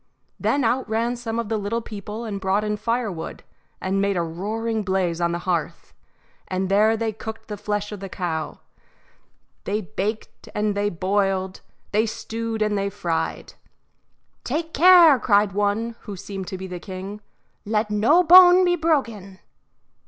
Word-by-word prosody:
Then 280 -1 +1
out 245 +1 0
ran 230 +2 0
some 230 -2 -4
of 235 -2 -2
the 220 0 -1
little 205 +3 -2
people 215 0 -7
and 200 -3 -5
brought 195 +2 +1
in 210 0 -1
firewood 215 -5 -3 0.4
and 195 +1 -1
made 200 -1 0
a 170 - +1
roaring 215 +7 -3
blaze 185 -3 -1
on 170 0 +1
the 170 - -1
hearth, 175 -4 -3 0.5
and 185 0 -2
there 215 +3 +4
they 225 0 -1
cooked 220 +1 -8
the 210 - -3
flesh 205 0 -3
of 210 - -6
the 195 0 -7
cow 165 -4 -4 1.0
they 205 +2 -1
baked 200 +6 -5
and 210 0 0
they 205 0 0
boiled, 190 +1 -1 0.3
they 215 +2 +2
stewed 225 0 -3
and 210 -1 0
they 200 0 -1
fried. 175 -5 -3 0.9
"Take 320 +5 -3
care," 335 -3 +7
cried 205 -3 +3
one, 205 +4 -1
who 205 - -8
seemed 190 0 -7
to 190 - -5
be 190 - -7
the 180 -1 -6
king, 195 +3 -8 0.4
"let 210 0 -1
no 235 +13 +4
bone 360 +1 +8
be 350 0 +3
broken." 230 - -1
210 Hz, 160 wpm, -23 LUFS, 190-230 Hz, 1.0 s, bone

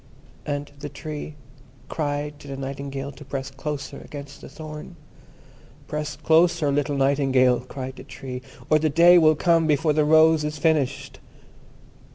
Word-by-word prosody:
And 145 0 -3
the 145 0 -6
Tree 150 +1 -7 0.5
cried 145 -1 -3
to - - -13
the 135 -1 -6
Nightingale 140 0 -5
to 145 - -13
press 135 -1 -5
closer 140 +1 -5
against 140 -1 -10
the - - -10
thorn. 155 +3 -9 0.9
"Press 150 0 -4
closer, 165 -2 +3
little 145 0 0
Nightingale," 135 -2 +3
cried 130 +1 -7
the - - -9
Tree, 130 -2 -7 0.3
"or 155 - +4
the 155 0 +1
Day 175 +4 +7
will 155 -1 +5
come 165 +1 +3
before 150 +1 +2
the 155 0 +3
rose 160 +1 +5
is 150 0 -3
finished." 145 -4 0
145 Hz, 150 wpm, -24 LUFS, 140-155 Hz, 0.9 s, Day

